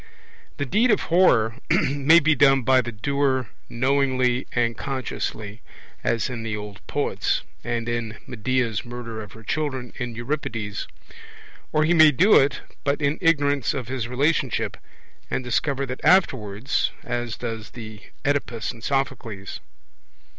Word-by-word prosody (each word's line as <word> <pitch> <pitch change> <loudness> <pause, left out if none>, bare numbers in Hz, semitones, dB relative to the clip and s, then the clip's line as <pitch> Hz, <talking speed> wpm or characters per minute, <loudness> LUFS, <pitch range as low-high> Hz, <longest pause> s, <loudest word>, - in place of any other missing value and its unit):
The 145 - -1
deed 220 - +2
of 210 - +3
horror 115 -11 +4
may 145 +5 +5
be 160 0 +3
done 135 -2 +4
by 130 +2 +5
the 120 -1 -5
doer 130 +2 0 0.2
knowingly 130 0 +1
and 115 -1 +1
consciously, 115 -5 -4 0.4
as 115 -3 +1
in 125 -3 -5
the 110 -1 -3
old 105 -1 -8
poets, - - -1 0.2
and 115 0 -2
in 115 -2 -3
Medea's 120 -2 -1
murder 120 -2 -6
of 105 -3 -10
her 110 - -13
children 130 -2 -3
in 120 -1 -4
Euripides. 115 -5 -3 0.8
Or 155 - +3
he 160 +3 +3
may 160 -2 +8
do 185 +8 +4
it, 135 - +4 0.2
but 140 0 0
in 145 +1 0
ignorance 145 -4 +2
of 125 -3 -4
his 130 -3 -2
relationship, 140 +6 0 0.5
and - - -2
discover 140 +2 0
that 130 -1 -6
afterwards, 130 - +2
as 120 -1 -3
does 115 -3 -5
the 110 -3 -9 0.2
Oedipus 140 -5 -1
in 120 -3 -14
Sophocles. 120 -7 -3
125 Hz, 140 wpm, -24 LUFS, 115-140 Hz, 0.8 s, may